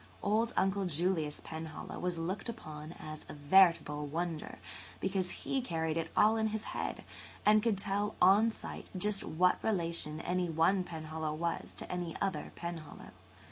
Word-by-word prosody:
Old 225 +3 +2
Uncle 195 +1 +2
Julius 160 -2 0
Penhallow 160 -1 -6
was 180 -1 -1
looked 185 +7 -2
upon 155 -7 -7
as 155 -2 -8
a - - -7
veritable 150 -1 +4
wonder 165 +1 -3 0.4
because 190 -2 0 0.2
he 270 - +1
carried 160 -8 -1
it 165 -1 -1
all 215 +2 +6
in 220 0 +2
his 215 0 -2
head - - -3 0.4
and 215 0 +6
could 220 -2 +1
tell 205 +1 -1
on 200 +5 +6
sight 225 - -7
just 205 +2 +1
what 180 +3 +2
relation 170 -6 +1
any 180 -1 0
one 165 +4 +3
Penhallow 155 -2 -4
was 170 +1 -2
to - - -5
any 175 -2 -3
other 195 -1 -2
Penhallow. 170 -3 -7
175 Hz, 155 wpm, -33 LUFS, 160-200 Hz, 0.4 s, all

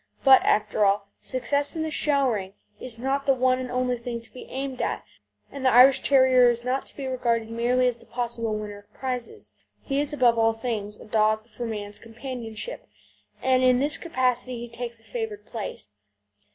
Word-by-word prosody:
But, 265 -1 +8
after 210 0 +2
all, 200 0 +2
success 285 +4 -1
in 320 - -1
the 315 - -3
show 280 -3 +2
ring 195 -5 -2 0.3
is 245 -3 -7
not 270 +3 -1
the 270 - +5
one 255 0 +2
and 255 -1 -4
only 250 -1 -1
thing 235 0 -4
to 230 - -17
be 255 - -10
aimed 265 -1 -4
at, - - -2 0.5
and 275 -1 -7
the 260 - +5
Irish 260 +2 +7
Terrier 260 -2 +5
is 240 0 0
not 255 +2 -1
to - - -5
be 275 - -4
regarded 235 -3 -1
merely 245 +2 +2
as 245 -1 0
the 230 - -17
possible 235 -2 -2
winner 205 -1 -6
of 205 - -24
prizes. 260 - -5 0.3
He 275 0 -1
is 290 0 -1
above 245 -5 +3
all 225 0 +4
things 220 -3 -4
a - - -12
dog 215 0 +1
for 235 +2 -5
man's 205 -2 -5
companionship, 235 - -7 0.6
and 255 0 +3
in 255 -1 +5
this 285 +3 0
capacity 255 -5 0
he - - -13
takes 235 -1 -6
a - - -23
favoured 220 -2 -5
place. 215 - -6
245 Hz, 195 wpm, -25 LUFS, 225-260 Hz, 0.6 s, But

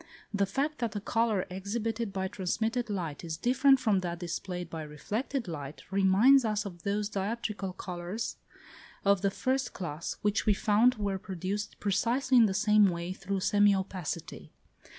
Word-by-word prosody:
The 200 -1 +1
fact 290 +9 -1
that 230 -3 -2
a - - 0
colour 220 -2 +1
exhibited 220 +3 -3
by 190 -1 -2
transmitted 220 +5 -1
light 175 -8 -3
is 160 -2 -4
different 265 +4 +4
from 215 -6 +2
that 175 -2 -3
displayed 175 0 -4
by 165 -1 -6
reflected 205 - -3
light, 145 -3 -6
reminds 200 +8 +5
us 215 -1 0
of 175 -4 -8
those 205 +3 -1
dioptrical 205 -2 -3
colours 180 +4 -4 0.7
of 200 -1 +4
the 200 - +2
first 260 +5 -1
class 165 -3 -4
which 210 +1 +1
we 210 - +5
found 225 +4 +4
were 200 -2 -2
produced 195 +2 -4
precisely 240 +6 +2
in 230 -2 +7
the 190 - -1
same 210 0 +5
way 170 +1 -3
through 195 0 -3
semi 205 +1 +4
opacity. 185 -4 -5
200 Hz, 160 wpm, -30 LUFS, 185-225 Hz, 0.7 s, in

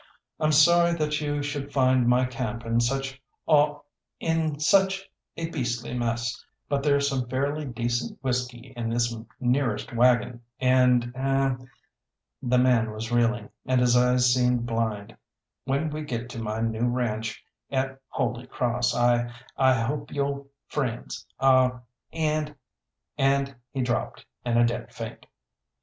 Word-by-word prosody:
I'm 155 -1 +2
sorry 170 +3 +5
that 150 -1 0
you 145 -1 -1
should 145 -1 -4
find 130 -3 +3
my 125 +1 +4
camp 120 -2 -4
in 115 +1 +1
such 135 +2 -1 0.2
aw 150 -1 +3 0.4
in 160 -2 0
such 195 +4 +3 0.3
a 165 - -2
beastly 120 -5 -3
mess, 120 0 -2 0.2
but 140 -1 0
there's 140 -1 +2
some 130 -4 -2
fairly 140 +4 -1
decent 120 -1 -2
whisky 125 0 -3
in 115 -1 -3
this 120 0 0 0.2
nearest 125 -1 0
waggon, 120 0 +3 0.2
and 125 -2 +3
er 135 -1 +1 0.4
" - - -61
the 125 - +5
man 125 -3 +3
was 110 +2 -6
reeling, 120 -2 +1 0.2
and 130 0 +3
his 125 -1 +4
eyes 125 0 +4
seemed 125 -1 +2
blind, 115 -3 -2 0.5
"when 140 +4 0
we 155 +1 -4
get 120 -5 -4
to 115 - -6
my 110 0 -3
new 115 +1 0
ranche 115 -3 -2 0.2
at 135 0 -2
Holy 120 0 -2
Cross 120 -1 0
I 120 0 +2 0.2
I 130 -1 +4
hope 140 +5 -2
you'll 140 -1 -2 0.2
friends 125 -6 -4
aw 130 -1 +4 0.3
and 155 -2 -1 0.3
" - - -58
And 135 0 +2
he 130 0 -2
dropped 120 -1 -2 0.2
in 120 -1 +1
a 120 - +6
dead 120 0 -3
faint. - - -8
125 Hz, 145 wpm, -26 LUFS, 120-140 Hz, 0.5 s, a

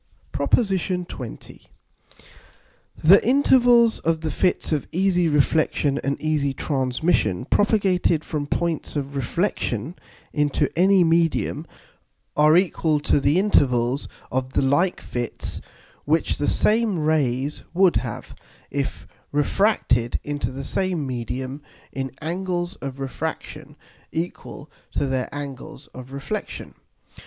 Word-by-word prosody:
PROP. - - -3
XX. 190 -5 -1 2.0
_The 190 +5 +8
Intervals 245 -2 +4
of 165 -1 0
the 160 -1 -2
Fits 180 +3 0
of 150 -3 -1
easy 180 -1 +2
Reflexion 150 -1 +2
and 140 0 -1
easy 150 -3 0
Transmission, 130 - 0
propagated 190 -5 +2
from 150 -2 -3
points 170 0 -2
of 140 -1 -3
Reflexion 135 - -1 0.4
into 145 -2 +1
any 185 +2 +5
Medium, 165 -1 +1 0.7
are 155 +2 +5
equal 165 -4 +1
to 145 - +2
the 140 +4 +2
Intervals 135 - +2 0.2
of 130 0 -2
the - - +2
like 145 +7 +2
Fits, 120 -1 -5 0.4
which 160 +2 +1
the 145 - +1
same 215 -3 +2
Rays 145 -3 0
would 185 -5 +4
have, 120 -2 -5 0.4
if 140 -1 -3 0.3
refracted 145 - +1
into 145 -5 -3
the 135 +1 -6
same 180 0 -1
Medium 130 +2 -4 0.3
in 135 -1 -4
Angles 175 +1 -2
of 135 -1 -7
Refraction 135 -3 -5 0.4
equal 160 -3 -5 0.3
to - - 0
their 130 -1 -1
Angles 140 -1 -7
of 130 +1 -10
Reflexion. 140 +10 -5
150 Hz, 115 wpm, -23 LUFS, 135-180 Hz, 2.0 s, The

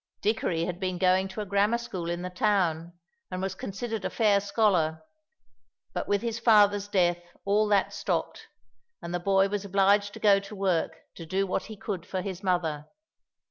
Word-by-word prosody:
Dickory 200 -6 0
had 175 0 -4
been 185 -2 -2
going 185 +1 +3
to 190 +3 -6
a - - -4
grammar 200 +4 +2
school 185 -8 -5
in 175 +1 -3
the 180 - -5
town, 180 -4 0 0.4
and 185 - -4
was 190 0 -2
considered 210 +3 -5
a - - -1
fair 210 -3 +3
scholar, 190 -6 +1 0.9
but - - -3
with 205 +1 0
his 230 -1 -2
father's 205 -3 +4
death 175 -3 +2 0.3
all 210 +2 +2
that 205 -2 +2
stopped, - - -3 0.6
and 170 +1 -5
the 175 - 0
boy 195 +2 +3
was 205 0 -3
obliged 200 +1 +2
to - - -8
go 200 -2 +5
to 200 +2 -10
work 190 -4 -1
to 165 - -10
do 195 +4 0
what 190 - -2
he 215 - -9
could 195 -5 -4
for 185 -1 -4
his 190 -2 -5
mother. 165 -6 -1
195 Hz, 185 wpm, -27 LUFS, 180-205 Hz, 0.9 s, go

